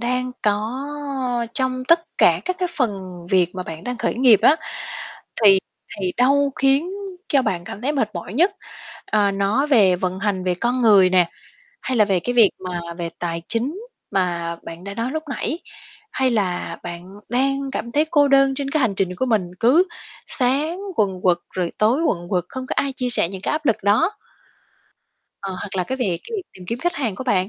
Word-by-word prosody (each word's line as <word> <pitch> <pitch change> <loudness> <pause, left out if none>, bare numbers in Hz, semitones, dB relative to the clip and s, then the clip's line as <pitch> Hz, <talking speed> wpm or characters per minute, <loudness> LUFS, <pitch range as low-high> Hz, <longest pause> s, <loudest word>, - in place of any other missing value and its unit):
đang 250 +1 -1
có 210 +1 +1 0.8
trong 260 -1 0
tất 335 0 +6 0.2
cả - - +5
các 370 0 -2
cái 360 - 0
phần 250 -6 +2 0.4
việc 180 -2 +2
mà 185 - -3
bạn 160 0 -8
đang 250 -1 -4
khởi - - -1
nghiệp 240 -4 +5
á, 310 - +6 0.9
thì 195 -2 +8 0.4
thì 185 -2 -1
đâu 275 +2 +3
khiến 275 +6 +2 0.4
cho 275 -2 +3
bạn 175 -7 -2
cảm 200 - -8
thấy 280 +4 +1
mệt 245 -7 0
mỏi 175 +3 -6
nhất? 365 - +3 0.5
Ờ, 205 -2 +2
nó 200 +8 +1
về 210 -11 +5
vận 185 +1 -2
hành, 195 -2 -1
về 180 -1 +1
con 240 +7 -1
người 200 -5 +6
nè, 180 -2 +4 0.5
hay 260 - -1
là 215 - +6
về 195 -3 +1
cái 245 - -2
việc 230 -5 +6 0.2
mà 175 -1 -3 0.2
về 170 -1 -3
tài 170 -1 -3
chính 265 - +1 0.3
mà 170 -3 -1
bạn 165 +2 -9
đã 200 0 -6
nói 230 +4 -2
lúc 315 +3 -3
nãy, 275 +3 -2 0.5
hay 260 -1 +1
là 195 -6 -1
bạn 175 +2 -8
đang 275 +3 0
cảm 235 -2 -4
thấy 295 +4 +3
cô 290 -3 +4
đơn 275 0 +4
trên 275 0 -2
cái 310 - +1
hành 230 -7 +1
trình 195 -2 +1
của 260 - -1
mình, 220 -5 +2 0.2
cứ 270 +10 +5 0.4
sáng 290 +8 0 0.2
quần 190 -4 0
quật 180 -2 +4
rồi 180 -2 -2
tối 235 +9 +3
quần 175 - -1
quật, 180 -3 0
không 260 0 -6
có - - -4
ai 275 - +1
chia 250 -1 -1
sẻ 215 - +4
những 190 0 -7
cái - - -1
áp 305 0 -2
lực 230 - +3
đó? 215 - +2 1.3
Ờ, 195 -1 -4
hoặc 195 +2 -6
là 180 - 0
cái 260 - -3
về 195 -9 0
cái 440 -4 -3
tìm 185 - -12
kiếm 230 +5 -3
khách 350 +4 -1
hàng 240 -8 -2
của 260 - -6
bạn 190 -6 +1
230 Hz, 205 wpm, -21 LUFS, 185-270 Hz, 1.3 s, thì